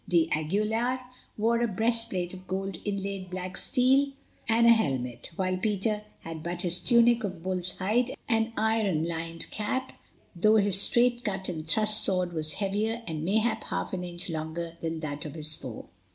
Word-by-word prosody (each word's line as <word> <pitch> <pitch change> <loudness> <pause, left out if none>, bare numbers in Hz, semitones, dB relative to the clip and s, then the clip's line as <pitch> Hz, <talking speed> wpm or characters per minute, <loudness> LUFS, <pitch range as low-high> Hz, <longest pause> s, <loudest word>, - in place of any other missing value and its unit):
d'Aguilar 205 +9 +1 0.4
wore 230 +2 +2
a 240 - +3
breastplate 220 -4 +1
of 185 0 -11
gold 190 -1 -3
inlaid 195 -2 -3
black 185 +1 -5
steel 270 +5 +3 0.4
and 230 +1 +4
a 235 - +9
helmet, 130 - 0
while 185 0 0
Peter 210 +2 0 0.2
had 165 -1 -7
but 175 +2 -4
his 175 0 +1
tunic 235 0 +4
of 185 -5 -4
bull's 185 -1 -2
hide 225 +6 +1 0.2
and 225 0 +1
iron 215 -7 +1
lined 165 0 -4
cap, 260 +5 -2 0.4
though 215 +5 +4
his 200 -2 +4
straight 240 +2 +4
cut 190 -3 -2
and 160 -3 -5
thrust 215 +5 +3
sword 180 -2 +1
was 155 -1 -2
heavier 210 +5 -1
and 155 -2 -4
mayhap 215 +6 +1
half - - -3
an 180 -1 -2
inch 175 0 -4
longer 165 0 -4
than 165 -1 -3
that 145 -2 -4
of 150 -1 -7
his 155 -1 -3
foe. 125 -6 -8
190 Hz, 165 wpm, -28 LUFS, 165-220 Hz, 0.4 s, a